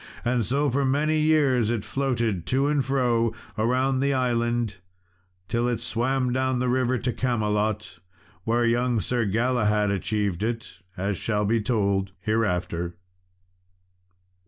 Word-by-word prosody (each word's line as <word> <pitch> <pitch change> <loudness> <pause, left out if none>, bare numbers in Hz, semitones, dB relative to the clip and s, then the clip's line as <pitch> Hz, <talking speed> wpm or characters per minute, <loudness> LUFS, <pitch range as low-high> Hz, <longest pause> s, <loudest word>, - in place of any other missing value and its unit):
And 120 -1 +1
so, 140 +7 +1
for 140 +3 +1
many 150 +4 +1
years, 145 -7 +3
it 115 -3 -2
floated 115 -7 -1
to 135 +2 +2
and 145 -1 +2
fro 120 -4 +1 0.2
around 130 +4 +1
the 140 0 +1
island, 120 -4 0 0.7
till 120 +3 0
it 120 -2 -1
swam 125 +2 0
down 130 0 +1
the 125 +1 0
river 130 0 +1
to 125 0 -2
Camelot, 105 -6 -1 0.4
where 120 +3 +1
young 120 0 +2
Sir 120 +3 0
Galahad 105 -1 +1
achieved 100 -1 -1
it, 115 +1 -4 0.2
as 95 +1 -1
shall 105 +1 -1
be 115 +2 +2
told 100 -4 0
hereafter. 90 -5 -1
120 Hz, 135 wpm, -25 LUFS, 105-130 Hz, 0.7 s, years